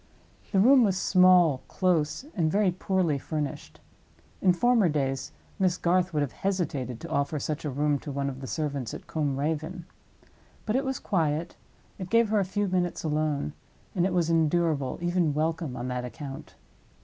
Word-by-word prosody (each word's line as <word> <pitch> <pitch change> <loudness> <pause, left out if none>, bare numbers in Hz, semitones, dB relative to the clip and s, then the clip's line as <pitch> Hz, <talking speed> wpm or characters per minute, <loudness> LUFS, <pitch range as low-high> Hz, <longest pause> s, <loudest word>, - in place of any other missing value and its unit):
The 195 - +3
room 255 +5 +7
was 195 -4 +2
small, 180 -7 +5
close, 175 - 0
and 160 -5 +1
very 200 -1 +3
poorly 180 -4 0
furnished. 150 -1 -5 0.6
In 185 - +5
former 225 +1 +3
days 135 -3 -1 0.3
Miss 185 -2 +2
Garth 180 +1 +1
would 150 -2 0
have 140 - -3
hesitated 145 - -2
to 165 - -7
offer 140 0 0
such 150 +1 -3
a - - -1
room 145 +1 0
to 145 - -7
one 140 0 -2
of 135 -1 -5
the 130 - -6
servants 140 -7 -3
at - - -10
Combe 145 -4 -1
Raven. 160 +4 -3 0.8
But 215 - 0
it 270 +1 +1
was 265 -1 -1
quiet; 165 -3 -1 0.4
it 185 -1 -6
gave 230 0 +4
her 215 -1 +2
a 195 - +1
few 205 +2 -1
minutes 180 -2 -1
alone; 150 - -1 0.4
and 175 - +1
it - - -3
was 170 -2 +1
endurable, 160 -4 +1
even 175 -4 +1
welcome, 160 -3 -1
on 120 - -4
that 125 0 -3
account. 135 +2 -8
160 Hz, 175 wpm, -27 LUFS, 145-185 Hz, 0.8 s, room